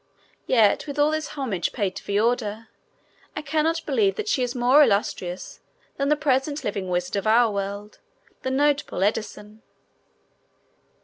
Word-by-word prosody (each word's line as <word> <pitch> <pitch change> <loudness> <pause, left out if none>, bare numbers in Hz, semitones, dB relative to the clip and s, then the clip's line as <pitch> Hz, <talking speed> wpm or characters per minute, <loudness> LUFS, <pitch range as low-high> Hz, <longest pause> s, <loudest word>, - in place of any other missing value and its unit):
Yet 225 +1 +3
with 285 0 -6
all 295 +1 +3
this 310 0 -2
homage 225 -11 -2
paid 200 -5 -2
to - - -8
Veorda, 220 +1 -1 0.7
I 305 - -4
cannot 315 +3 0
believe 400 -3 +1
that 430 -1 -4
she 285 - +1
is 245 0 -2
more 250 +4 +5
illustrious 200 -7 0 0.4
than 275 0 0
the 300 - +4
present 285 +1 0
living 195 -2 -3
wizard 180 +2 -1
of 200 - -2
our 230 +1 +4
world, 200 +1 -5 0.4
the 260 - -2
notable 285 -7 +1
Edison. 210 +1 -3
240 Hz, 145 wpm, -24 LUFS, 205-290 Hz, 0.7 s, more